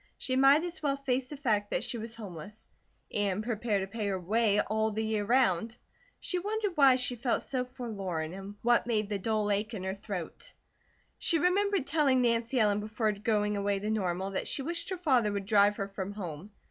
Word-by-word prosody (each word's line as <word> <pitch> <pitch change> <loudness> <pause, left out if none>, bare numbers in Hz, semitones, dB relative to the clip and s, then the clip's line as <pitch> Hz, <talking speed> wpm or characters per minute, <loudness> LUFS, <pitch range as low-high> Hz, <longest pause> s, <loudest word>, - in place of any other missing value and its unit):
She 255 - -2
might 275 +4 +6
as 350 0 -4
well 280 -2 0
face 260 -2 -1
the 295 - -6
fact 215 -7 0
that - - -1
she 235 - -3
was 225 +1 -6
homeless; 205 -1 -9 0.5
and 205 0 0
prepare 215 -3 -1
to - - -1
pay 210 +1 -4
her 190 -2 -1
way 210 +3 +2
all 220 +1 +1
the 220 +1 -2
year 215 -1 0
round. 230 -1 +2 0.4
She 365 - -1
wondered 415 +2 -1
why 275 -5 +6
she 250 -1 +1
felt 240 +1 0
so 255 -2 -1
forlorn 195 -10 -4
and 195 +2 -8
what 240 0 +3
made 215 -3 0
the 205 -2 -2
dull 215 0 0
ache 210 +3 -1
in 190 - -5
her 190 0 -2
throat. 195 -4 -6 0.7
She 335 - +3
remembered 385 0 +2
telling 280 -4 +3
Nancy 235 +1 +1
Ellen 210 -2 +3
before 215 +1 -1
going 210 0 0
away 200 0 0
to 210 +2 -2
Normal 190 -2 -1
that 190 - -2
she 275 - 0
wished 340 +4 -2
her 375 - -3
father 260 -11 +2
would 200 -1 -3
drive 205 0 +4
her 195 - -2
from 195 0 -5
home. 180 -2 -7
220 Hz, 205 wpm, -30 LUFS, 200-255 Hz, 0.7 s, might